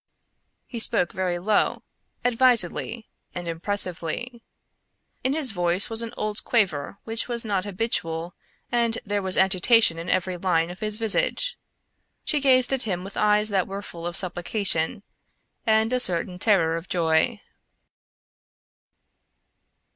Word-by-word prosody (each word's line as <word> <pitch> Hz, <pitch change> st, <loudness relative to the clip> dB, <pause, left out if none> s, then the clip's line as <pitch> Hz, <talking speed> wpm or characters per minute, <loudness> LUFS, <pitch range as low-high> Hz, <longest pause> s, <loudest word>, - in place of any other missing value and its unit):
He 235 Hz, -, -7 dB
spoke 180 Hz, -5 st, +2 dB
very 185 Hz, -2 st, -2 dB
low, 205 Hz, +4 st, 0 dB, 0.4 s
advisedly, 235 Hz, -2 st, +2 dB, 0.3 s
and 175 Hz, -1 st, -6 dB
impressively. 185 Hz, +6 st, -3 dB, 0.8 s
In 260 Hz, -, 0 dB
his 290 Hz, -6 st, +3 dB
voice 175 Hz, +2 st, -1 dB
was 225 Hz, +1 st, +4 dB
an 230 Hz, -1 st, -4 dB
old 215 Hz, -1 st, -1 dB
quaver 195 Hz, -, -1 dB
which 225 Hz, 0 st, -1 dB
was 235 Hz, -1 st, -1 dB
not 200 Hz, -3 st, -1 dB
habitual 180 Hz, -5 st, -2 dB, 0.4 s
and 235 Hz, -1 st, +1 dB
there 205 Hz, 0 st, -1 dB
was 190 Hz, -1 st, +1 dB
agitation 190 Hz, -1 st, +4 dB
in 170 Hz, -, -6 dB
every 185 Hz, 0 st, -1 dB
line 170 Hz, -2 st, 0 dB
of 180 Hz, -, -11 dB
his 215 Hz, -1 st, -2 dB
visage. -, -, 0 dB, 0.7 s
She 300 Hz, -, 0 dB
gazed 260 Hz, -2 st, +4 dB
at 265 Hz, -, -1 dB
him 185 Hz, -7 st, -3 dB
with 195 Hz, +1 st, -9 dB
eyes 210 Hz, 0 st, +3 dB
that 195 Hz, -3 st, 0 dB
were 195 Hz, +1 st, -6 dB
full 170 Hz, -3 st, -7 dB
of 175 Hz, -, +1 dB
supplication 180 Hz, 0 st, 0 dB, 0.6 s
and 220 Hz, +2 st, +2 dB
a 250 Hz, -, +2 dB
certain 180 Hz, -4 st, +4 dB
terror 170 Hz, -6 st, +2 dB
of 165 Hz, +2 st, -9 dB
joy. 170 Hz, +6 st, +1 dB
200 Hz, 135 wpm, -24 LUFS, 175-230 Hz, 0.8 s, was